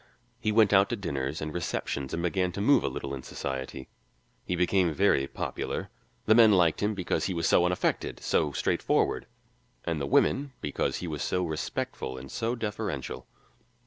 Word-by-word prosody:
He 110 -4 0
went 105 -2 +4
out 100 0 +5
to - - 0
dinners 70 - -3
and 75 0 -4
receptions 70 -5 -3
and 85 - -2
began 90 +1 +1
to - - -5
move 140 +8 +4
a - - 0
little 70 0 -5
in 65 - -5
society. 65 0 -5 0.6
He 90 - -2
became 90 0 +2
very 90 -8 +3
popular: - - -4 0.3
the 110 - +6
men 110 -2 +7
liked 85 -4 +3
him 105 +1 +1
because 90 -4 -1
he 95 - -2
was 85 -1 0
so 85 - +5
unaffected, 90 0 -1
so 75 - +1
straightforward, - - 0 0.6
and 80 -3 -1
the 70 - -1
women 135 - +2
because 75 - -1
he - - -5
was - - -4
so 90 0 0
respectful 75 -4 -4
and 65 +1 -9
so 115 +1 -1
deferential. 105 - -4
90 Hz, 175 wpm, -28 LUFS, 70-105 Hz, 0.6 s, men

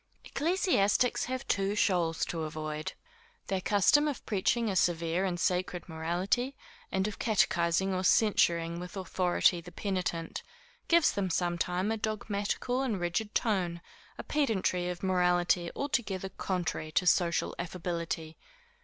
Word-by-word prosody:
Ecclesiastics 290 - +1
have 260 +2 -4
two 200 +1 +1
shoals 175 -6 +1
to 165 - -4
avoid. 155 0 -4 0.5
Their 190 -1 -1
custom 210 +11 +4
of 285 -5 -4
preaching 225 +3 +1
a 195 - -1
severe 170 +1 +1
and 175 -2 -2
sacred 180 0 -1
morality, 180 +11 -1 0.4
and 190 +1 +1
of 210 - -6
catechising 190 -3 +2
or 185 0 -1
censuring 170 -5 +3
with 180 +2 -7
authority 180 -2 +2
the 175 - -11
penitent, 180 -3 -3 0.5
gives 340 -2 +5
them 195 -2 -1
sometime 180 +3 0
a 225 - 0
dogmatical 215 +3 -2
and 230 -8 -1
rigid 175 +5 -2
tone, 180 -6 0 0.4
a - - -6
pedantry 190 -11 0
of 180 +1 -6
morality 180 -2 +2
altogether 220 -9 -2
contrary 175 -4 -3
to 180 - +2
social 175 -1 +2
affability. 170 -2 -4
185 Hz, 130 wpm, -30 LUFS, 175-210 Hz, 0.5 s, gives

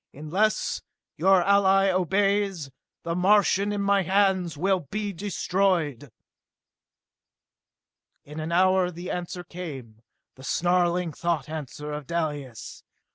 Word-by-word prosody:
Unless 180 +9 -1 0.3
your 190 -2 +4
ally 195 0 +4
obeys, 195 -3 0 0.3
the 170 - -2
Martians 200 +2 +3
in 200 - -2
my 200 0 +3
hands 190 -3 +1
will 190 +4 +1
be 210 -1 -3
destroyed!" 175 - -1 2.1
In 150 +2 -9
an 160 +2 -4
hour 185 +1 +3
the 175 +1 -7
answer 180 0 -5
came, 140 -12 -9 0.3
the 130 - -15
snarling 175 0 +1
thought 170 0 -2
answer 150 -1 -6
of 150 -2 -6
Dalis. 145 -8 -4
180 Hz, 110 wpm, -26 LUFS, 155-195 Hz, 2.1 s, your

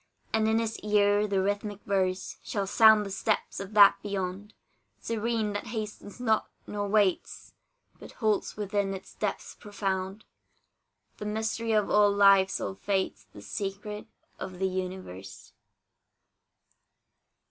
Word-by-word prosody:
And 220 0 +2
in 220 0 +3
his 225 -1 -2
ear 205 0 +3
the 195 -2 +1
rhythmic 205 0 -2
verse 190 -2 -1
Shall 200 -2 -2
sound 220 +1 +6
the 195 - -6
steps 215 +2 -1
of 200 +2 -7
that 205 -1 +8
beyond, 200 +1 -4 0.4
Serene, 225 -1 -1
that 205 +3 -4
hastens 215 -1 -6
not, 220 -3 +1 0.2
nor 205 -1 -3
waits, 200 -3 0 0.5
But - - -12
holds 215 -4 -1
within 200 -1 -1
its 190 - -11
depths 210 -2 -3
profound 195 0 -4 0.9
The 210 - -6
mystery 220 +1 -1
of 210 -2 +2
all 210 -1 +5
lives 195 -1 +5
all - - -3
fates 195 0 -2
The 100 - -12
secret 205 - -5 0.3
of 185 -1 -6
the 190 +1 0
universe. 185 - -6
205 Hz, 130 wpm, -28 LUFS, 195-215 Hz, 0.9 s, that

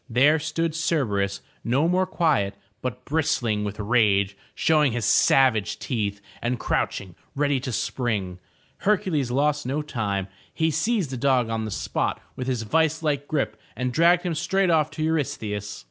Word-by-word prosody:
There 140 +7 +4
stood 160 +2 -1
Cerberus, 110 -12 0 0.2
no 135 +7 +2
more 185 +1 +2
quiet, 150 - +1 0.3
but 125 0 -5
bristling 130 -9 0
with 105 0 -5
rage, 100 -3 +2 0.2
showing 150 -5 +3
his 120 -3 -1
savage 120 -5 +4
teeth, 105 -5 -2 0.2
and 120 0 -1
crouching 95 -3 -2 0.2
ready 145 -1 +1
to 130 0 -4
spring. 105 -6 -2 0.4
Hercules 180 - +1
lost 145 +2 +1
no 145 +3 -1
time. 105 -9 -2 0.2
He 160 -1 +1
seized 170 - 0
the 130 - -3
dog 125 -2 +2
on 110 -1 -1
the - - -4
spot - - -2 0.2
with 125 - -5
his 125 -3 -1
vice 160 +6 +1
like 145 -2 0
grip, 150 -3 -2
and 125 -1 -2
dragged 170 +4 +4
him 175 -2 -1
straight 190 +3 +1
off 155 -2 +3
to 155 +1 -4
Eurystheus. 110 -10 -2
135 Hz, 160 wpm, -25 LUFS, 110-160 Hz, 0.4 s, There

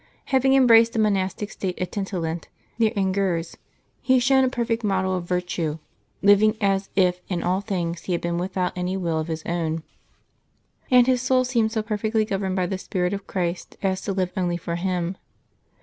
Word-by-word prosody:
Having 265 0 +4
embraced 230 -3 +6
the - - -3
monastic 205 -1 0
state 185 -2 -4
at 185 - -3
Tintillant, 175 -5 -3 0.3
near 220 -2 +3
Angers, 190 -4 0 0.5
he 260 -1 +3
shone 265 +2 +4
a 260 - +3
perfect 235 -2 -1
model 190 -2 +1
of 180 -1 -3
virtue, 175 -3 -1 0.5
living 210 +2 +5
as 195 -1 +1
if 180 -2 +2
in 175 -3 -2
all 185 +2 +1
things 175 -5 -3
he 185 - -1
had 170 - -1
been 170 0 -1
without 185 0 -2
any 180 +1 -2
will 170 -4 -1
of 155 - -3
his 160 -1 -4
own; 165 -2 -2 1.1
and 250 -1 +6
his 255 -1 +2
soul 255 0 +3
seemed 235 -3 +1
so 220 -1 -1
perfectly 215 0 0
gov 195 -3 -2
erned 190 -1 -1
by 185 -1 +1
the 190 +1 -3
spirit 180 0 -1
of 200 -1 -5
Christ 175 -1 -3
as 190 -1 0
to 200 - -3
live 185 -2 -1
only 175 -3 0
for 170 0 -4
Him. 180 0 -2
190 Hz, 190 wpm, -24 LUFS, 180-215 Hz, 1.1 s, embraced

